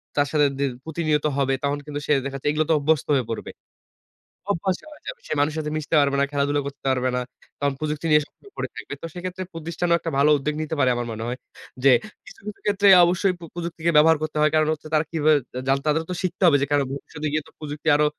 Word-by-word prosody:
তার 145 0 +2
সাথে 150 -2 +4
দি - - +1 0.2
প্রতিনিয়ত 155 -2 0
হবে, 135 -1 +1
তখন 140 +1 0
কিন্তু 145 -1 -5
সে - - 0
দেখাচ্ছে 135 0 -4
এগুলো 155 +1 +1
তে - - +5
অভ্যস্ত 155 +1 +1
হয়ে 130 - +1
পড়বে 115 - -5 1.0
অভ্যাস 185 +1 0 0.2
হয়ে 300 - -14
যাবে। - - -6
সে - - -2
মানুষের 150 +2 +1
সাথে 150 -1 -3
মিশতে 155 +1 -2
পারবে 140 -1 +2
না, 140 - +3
খেলাধুলা 145 0 +1
করতে 140 - -9
পারবে 130 -1 +1
না। 125 - 0 0.4
তখন 140 -1 0
প্রযুক্তি 155 +1 -3
নিয়ে 150 0 +5
সবসময় 405 - -21
পড়ে - - -3
থাকবে। - - -7
তো - - -5
সেক্ষেত্রে 185 +1 -5
প্রতিষ্ঠানও 170 +1 0
একটা 165 - -4
ভালো 145 +2 +4
উদ্যোগ 150 +2 -2
নিতে 155 0 -3
পারে 130 - +4
আমার 120 0 -3
মনে 110 0 -5
হয়। 125 +1 -3 0.5
যে, 140 - +7 0.4
কিছু, - - -14
কিছু 210 - -7
ক্ষেত্রে 200 -1 +3 0.2
অবশ্যই 180 +2 +1
পো 170 - -13
প্রযুক্তিকে 170 -1 -2
ব্যবহার 160 +1 +6
করতে 155 0 -3
হয়। 155 - +4
কারণ 155 0 +3
হচ্ছে 155 0 -9
তারা 155 +1 +3
কিভাবে 155 -1 +3 0.2
জা - - -2
জানতে, 135 +1 +2
তাদেরও 160 +2 +1
তো 180 - -2
শিখতে 185 +1 -2
হবে 145 -4 +6
যে, 140 - +2
কেন 145 -1 +4
ভবিষ্যতে 150 +2 -5
গিয়ে 155 -1 -1
তো - - -18
প্রযুক্তি 150 0 -7
আরো 150 0 +3
150 Hz, 235 wpm, -23 LUFS, 140-165 Hz, 1.0 s, যে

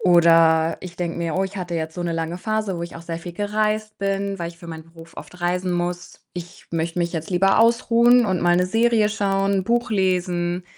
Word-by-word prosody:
oder 165 -2 +4
ich 175 -1 -9
denke 170 -1 -3
mir: 165 -2 -2
„Oh, 190 - +1
ich 195 +1 -7
hatte 175 -2 -4
jetzt 160 -1 -3
so 180 - -4
'ne 170 -1 -2
lange 165 +2 -3
Phase, 215 -2 -2
wo 170 - -4
ich 170 - -7
auch 165 - -10
sehr 165 0 -5
viel 175 +1 -8
gereist 215 +2 -1
bin, 195 0 -2
weil 170 - -3
ich 170 0 -13
für 170 - -12
meinen 160 -1 -8
Beruf 165 0 -16
oft 180 - -11
reisen 180 +1 0
muss. 175 0 -4
Ich 175 -1 -9
möchte 165 +1 -2
mich 170 -1 -1
jetzt 165 -2 -4
lieber 190 +3 +3
ausruhen 235 +1 +4
und 185 -4 0
mal 175 0 +3
'ne 180 - +3
Serie 225 +1 +2
schauen, 195 -2 0
Buch 240 +2 0
lesen 180 -3 0
180 Hz, 225 wpm, -22 LUFS, 170-200 Hz, -, oder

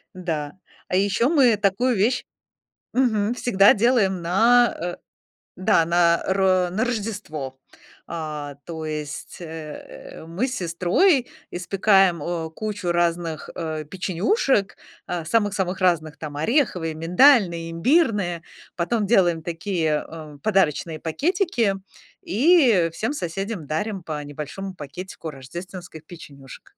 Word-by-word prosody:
Да. 155 -5 -3 0.4
А 185 - 0
ещё 200 +6 +2
мы 260 -9 +5
такую 215 +5 +1
вещь 225 +6 +1 0.7
мгм, 230 -4 +2
всегда 200 -5 +5
делаем 205 -5 +2
на, 230 +7 +4
э 175 +1 -3 0.6
да, 185 -3 +3
на 170 0 +3
ро 190 -2 +2
на 220 +6 0
Рождество. 200 - -4 0.5
А 150 -4 -5
то 160 -2 -6
есть, 150 -1 -6
э, 170 - -6 0.8
э, - - -11
мы 175 +10 -2
с 255 - -4
сестрой 185 - +2 0.2
печём 185 -1 +3
э, 165 -2 -3
кучу 205 0 -3
разных, 170 -2 -1
э, 155 -2 -4
печенюшек, 195 - 0 0.3
а 175 -2 -3
самых-самых 195 -2 0
разных, 160 -4 +1
там: 145 -2 -7
ореховые, 180 - +1
миндальные, 170 - +4
имбирные. 200 - +1 0.3
Потом 210 +5 0
делаем 175 -6 +3
такие, 165 -3 -1
эм, 155 -3 -10
подарочные 165 -4 +1
пакетики. 250 - 0 0.5
И 235 - +4
всем 225 +9 -2
соседям 195 - -4
дарим 195 +4 -3
по 150 -2 -5
небольшому 150 +7 -7
пакетику 165 +2 -8
рождественских 165 +4 -9
печенюшек. 140 -6 -13
180 Hz, 115 wpm, -23 LUFS, 165-215 Hz, 0.8 s, мы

